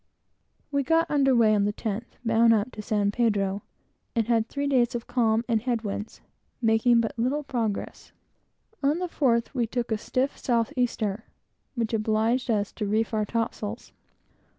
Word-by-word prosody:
We 280 -1 +1
got 325 +4 +2
under 270 -3 +3
weigh 225 -2 +5
on 205 -1 +2
the 205 - +1
10th, 220 +2 -5
bound 225 0 +5
up 215 +4 -1
to 215 - -7
San 205 -1 0
Pedro, 205 -4 0 0.5
and 230 -2 +1
had 230 -1 +1
three 285 0 -2
days 250 -4 +2
of 235 - -4
calm 230 -2 +1
and 225 -3 +1
head 235 -1 -1
winds, 210 +1 -5 0.4
making 230 0 +4
but 225 - -2
little 270 +6 0
progress. 230 -7 -3 0.7
On 290 +3 +2
the 360 0 -2
fourth, 240 -8 +1
we 240 -4 0
took 240 0 -3
a 220 - 0
stiff 260 +5 -1
south 230 -3 0
easter, 225 -4 -1 0.5
which 230 -2 -2
obliged 225 +3 +1
us 205 -3 +1
to 210 - -4
reef 220 +2 0
our 215 -1 +1
topsails. 225 0 -3
230 Hz, 170 wpm, -26 LUFS, 215-250 Hz, 0.7 s, weigh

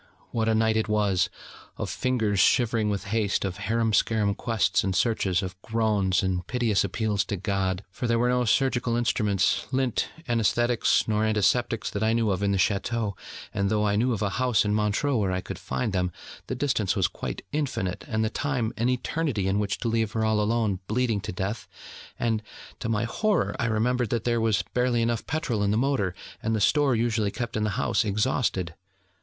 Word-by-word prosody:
what 115 -1 0
a 110 - +3
night 110 0 +2
it 110 - +1
was! 105 -3 +2 0.5
of - - -3
fingers 110 -6 0
shivering 115 -1 +3
with 100 -1 -2
haste, 105 -3 +1
of 95 -1 -3
harum 110 +2 0
scarum 105 -1 +2
quests 110 -4 +1
and 95 -1 -1
searches, 95 -3 +1
of 95 0 -7
groans, 105 -4 +1
and 90 -2 -1
piteous 120 -5 +1
appeals 105 0 0
to 100 - -4
God. 95 0 -1
For 120 +5 -3
there 115 0 +2
were 120 +1 +2
no 125 0 +2
surgical 120 0 +1
instruments, 105 -5 +1
lint, 130 -3 0 0.2
anaesthetics, 120 0 +2
nor 110 0 +1
antiseptics 110 +2 +1
that 100 - -3
I 110 +1 +2
knew 115 -2 +2
of 95 0 -1
in 100 -1 +1
the 100 - +1
Château; 105 +2 0 0.4
and 100 0 0
though 105 0 +1
I 100 -1 +2
knew 120 +5 +2
of 110 -3 -1
a 100 - +1
house 125 -6 +3
in 105 - +1
Montreux 105 +6 +1
where 100 -4 0
I 90 - 0
could - - -7
find 65 +10 -2
them, 90 -1 0 0.4
the 130 - -3
distance 115 -8 0
was 95 -3 +2
quite - - -6
infinite, 130 -12 -2
and 110 0 0
the 110 - -2
time 125 -6 -1
an 120 +2 +1
eternity 130 -4 -1
in 100 +1 +1
which 100 -1 -1
to - - -1
leave 110 -1 0
her 110 -1 0
all 110 -1 +2
alone, 105 -3 0
bleeding 115 -2 0
to - - -5
death; 95 +4 -4 0.5
and, 110 -2 0 0.4
to - - -3
my 110 0 +1
horror, 120 - 0
I - - +1
remembered 120 +1 +1
that 115 -2 -1
there 120 -1 +1
was 110 -3 +2
barely 125 -2 +2
enough 115 -1 -1
petrol 135 -9 -1
in 100 - +2
the 105 - +2
motor, 120 -8 0 0.3
and 110 0 0
the - - 0
store 140 +5 +3
usually 115 -2 +1
kept 115 +3 -5
in 110 -1 0
the - - 0
house - - +1
exhausted. 105 -4 0
110 Hz, 200 wpm, -26 LUFS, 100-120 Hz, 0.5 s, a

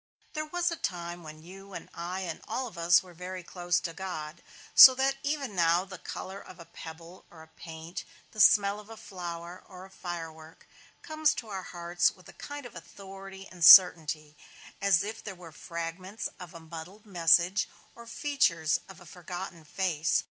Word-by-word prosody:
There 310 0 -3
was 350 +2 0
a - - -2
time 175 -4 -4
when 155 -1 -11
you 195 +3 -12
and - - -8
I 180 +3 -5
and 185 - -5
all 245 +4 -2
of 225 - -9
us 170 +1 +4
were 185 - -14
all 170 - -19
very 180 0 -6
close 175 0 -1
to 165 - -5
God; 165 -4 -6 0.3
so 260 - +11
that 270 +1 +1
even 280 -6 -2
now 170 +1 +3
the 185 -2 -10
color 190 +1 -7
of 185 - -14
a 170 - -11
pebble 165 +3 -11
(or 160 -2 -14
a - - -17
paint), 160 +1 -9 0.3
the 215 - -11
smell 200 +1 +5
of 210 +1 -14
a 225 - -10
flower 175 -2 -8
(or 185 -1 -11
a 190 - -17
firework), 165 -3 -8 0.4
comes 310 -1 +1
to 225 - -7
our 195 -2 -4
hearts 175 0 0
with 185 -3 -17
a - - -13
kind 290 -2 -8
of 240 - -11
authority 195 +2 -11
and 180 -2 -6
certainty; 155 -4 +7 0.5
as 200 -3 +4
if 220 +2 -6
they 205 - -6
were 175 -3 -12
fragments 170 +6 -6
of 175 -2 -10
a - - -8
muddled 165 +6 -10
message, 175 0 +3 0.2
or 235 0 -13
features 230 - +1
of 195 - -12
a 175 - -15
forgotten 175 0 -8
face. 160 -1 0
180 Hz, 190 wpm, -29 LUFS, 170-200 Hz, 0.5 s, so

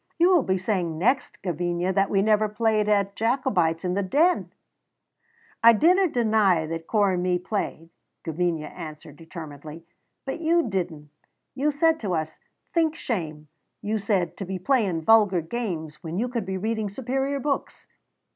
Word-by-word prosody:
"You 350 +2 +4
will 345 - +5
be 190 -6 0
saying 180 -4 -2
next, 250 - 0
Gavinia, 175 +1 -1
that 195 0 +2
we 195 -1 +2
never 215 0 +3
played 215 -1 +1
at 200 -1 +1
Jacobites 210 -9 0
in 180 - 0
the 200 - 0
Den!" 305 - +2 1.1
"I 230 0 +9
dinna 360 - +4
deny 215 - +2
that 165 +1 -5
Corp 205 -3 +2
and 180 - -1
me 180 0 +1
played," 180 -3 -4 0.3
Gavinia 165 -1 -1
answered 155 -1 -10
determinedly, 160 -1 -10 0.4
"but 270 +4 -4
you 335 -1 +2
didna. 175 -7 -3 0.5
You 275 +3 0
said 320 +2 +2
to 190 -5 -2
us, 155 -1 -4 0.3
'Think 320 -2 +2
shame,' 155 - -4 0.4
you 215 +1 -1
said, 195 -4 -1
'to - - -4
be 190 +1 -4
playing 190 -5 0
vulgar 205 -3 +5
games 165 -5 -5
when 165 0 -5
you 235 +5 0
could 235 -5 -3
be 190 0 -2
reading 220 +1 -2
superior 270 +5 -2
books.' 280 +1 -3
200 Hz, 160 wpm, -25 LUFS, 170-235 Hz, 1.1 s, I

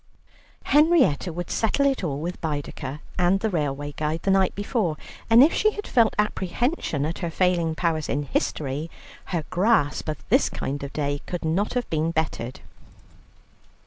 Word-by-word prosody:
Henrietta 295 - +4
would 175 +1 -5
settle 230 +5 +1
it 270 -6 +1
all 145 -5 -2
with 175 +3 -5
Baedeker 145 -2 -4 0.2
and 180 +2 +3
the 220 +1 -1
railway 145 -3 -2
guide 155 +2 -3
the 195 - +2
night 190 -1 +3
before, 205 - -1 0.3
and 230 +3 +8
if 310 - +4
she 430 - +3
had 415 - -6
felt 230 -4 +3
apprehension 210 - -1
at 165 +2 -3
her 170 - -2
failing 170 -2 +1
powers 160 -3 -1
in 145 +1 0
history, 145 +2 -2 0.4
her 170 -4 -2
grasp 185 -6 +2
of 150 - -6
this 260 +7 +4
kind 140 +1 -4
of 140 0 -6
day 145 -1 -2
could 175 -2 -4
not 190 +9 0
have 245 -2 -1
been 160 0 +1
bettered. 155 -7 -3
170 Hz, 165 wpm, -24 LUFS, 150-210 Hz, 0.4 s, and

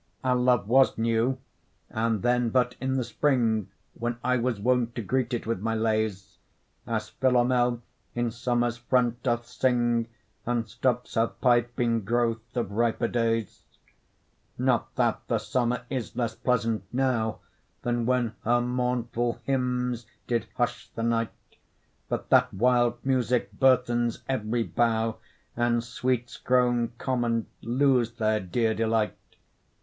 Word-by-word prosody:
Our 130 -1 +2
love 125 -4 +2
was 130 +3 +4
new, 115 +3 +1 0.5
and 110 -2 0
then 125 -1 +2
but 125 0 +1
in 130 0 0
the 130 - +1
spring, 120 -5 +1 0.2
When 120 0 -3
I 125 +1 +2
was 120 -3 -1
wont 120 +1 +1
to 115 - -3
greet 130 +3 0
it 120 - -2
with 115 -3 -1
my 115 +3 -1
lays; 110 -3 -1 0.5
As - - -2
Philomel 125 -1 +2 0.3
in 120 -1 0
summer's 120 0 0
front 120 0 +1
doth 120 -2 0
sing, 120 -2 +1 0.4
And 120 -1 -1
stops 125 +2 -1
her 115 0 +3
pipe 120 0 +1
in 115 -1 +2
growth 115 +2 -1
of 115 -5 -1
riper 115 +2 +1
days: 115 -3 -1 1.0
Not - - 0
that - - +1
the - - +1
summer 125 0 -1
is 125 -4 -4
less 120 -2 -1
pleasant 115 -3 0
now 125 -4 0 0.4
Than 120 -1 0
when 125 -3 +1
her 120 +2 +3
mournful 120 -1 -1
hymns 125 -3 -1 0.2
did 120 -2 -1
hush - - -1
the 115 - -3
night, 115 -1 +1 0.8
But - - -3
that - - +5
wild 120 +2 +3
music 125 -2 +1
burthens 120 -3 +2
every 120 -2 0
bough, 115 -1 0 0.4
And 120 -1 +1
sweets 120 0 -2
grown 120 -2 +2
common 120 -3 0 0.2
lose 125 -1 +2
their 110 -2 +1
dear 110 +4 0
delight. 110 -1 +1
120 Hz, 135 wpm, -27 LUFS, 115-125 Hz, 1.0 s, that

